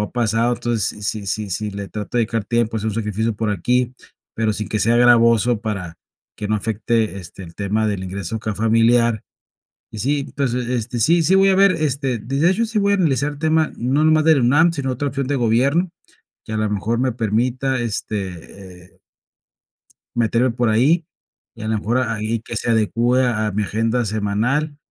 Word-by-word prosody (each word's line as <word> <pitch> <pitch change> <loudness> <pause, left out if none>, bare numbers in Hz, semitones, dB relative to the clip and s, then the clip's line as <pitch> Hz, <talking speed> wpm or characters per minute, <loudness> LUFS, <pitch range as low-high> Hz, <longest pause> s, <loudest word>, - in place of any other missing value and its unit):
ha 105 - -3
pasado, 120 0 +1
entonces, 115 -3 -2
si 105 -2 -3
si 105 +2 -3
si 105 +4 -2
le 100 0 -6
trato 105 +4 -6
de - - +4
dedicar 115 -2 -2
tiempo, 115 -1 0
es 105 - -6
un 110 -2 -1
sacrificio 110 0 -1
por 105 0 -2
aquí, 125 +6 0 0.4
pero 110 -1 0
sin 105 -2 -4
que 110 - -1
sea 115 +3 +3
gravoso, 120 -1 +4
para 100 -7 -5 0.4
que 105 - -5
no 110 - +1
afecte 110 0 -1
este, 90 +1 -10
el 85 -2 -11
tema 105 +3 -1
del 100 -3 -2
ingreso 95 +2 -4
acá 110 -1 -4
familiar. 115 +1 +3 0.7
Y 110 - -8
sí, 145 +4 0
entonces, 125 -3 -2
este 120 -1 -2
sí 165 +9 +4
sí 170 +4 +3
voy 195 0 +5
a 190 - +4
ver 195 0 +5
este 140 -6 -1
de 130 +6 -4
de 170 +3 +4
hecho 210 +5 +1
sí 220 -1 -2
voy 200 0 +2
a - - +3
analizar 150 -5 +1
el 145 - -11
tema, 160 0 +1
no 135 +6 +1
nomás 155 0 +4
de 160 - +6
la - - +2
UNAM, 145 +8 +4
sino 140 -5 -2
otra 140 +3 -2
opción 140 0 -3
de 140 +1 -1
gobierno, 135 +9 +2 0.6
que 110 - -6
a - - -1
la 110 0 0
mejor 110 +3 -1
me 130 -1 +1
permita 125 +4 -1
este, 95 -4 -5
eh - - -34 1.2
meterme 120 +2 +2
por 120 0 0
ahí, 150 +10 +2 0.5
y 115 - -9
a - - -4
la 110 0 0
mejor, 115 +4 -1
ahí 115 -2 -2
que 115 - -7
se 115 - -2
adecúe 115 +2 +2
a 120 -4 +1
a - - -2
mi 105 +2 -1
agenda 115 +4 0
semanal. 110 +9 -1
115 Hz, 205 wpm, -20 LUFS, 105-130 Hz, 1.2 s, de